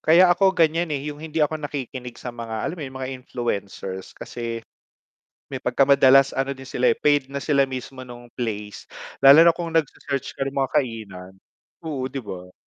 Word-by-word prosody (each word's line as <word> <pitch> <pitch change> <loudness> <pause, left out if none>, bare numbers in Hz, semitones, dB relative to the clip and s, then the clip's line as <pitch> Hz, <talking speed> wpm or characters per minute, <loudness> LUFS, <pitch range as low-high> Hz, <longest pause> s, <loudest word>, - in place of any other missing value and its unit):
Kaya 175 +3 +6
ako 190 0 +2
ganiyan, 165 +1 +2
eh, 140 - -2
'yung 145 - -10
hindi 160 0 -2
ako 155 +1 -3
nakikinig 130 -4 -6
sa 125 - -7
mga, 115 -2 -5
alam 180 - -3
mo - - -7
'yun 130 -2 -7
mga 130 0 -4
influencers 100 -6 -5
kasi, 115 -1 -6 0.9
may - - -4
pagkamadalas 135 0 +5
ano 135 +1 -2
din 135 0 -11
sila, 125 -1 +1
eh, - - -25
paid 145 -2 +2
na 140 0 -5
sila 140 -3 +3
mismo 130 0 -7
nung 120 -1 -12
place, 105 -4 -5 0.3
lalo 140 +4 +9
na 170 - +7
kung 170 -1 -5
nag 165 - +5
se-search 140 0 -5
ka - - -7
ng 135 - -6
mga 135 -1 0
kainan, 110 -10 -3 0.5
oo 140 -5 -3
'di 135 -1 -6
ba? 90 -3 -8
135 Hz, 190 wpm, -23 LUFS, 120-150 Hz, 0.9 s, lalo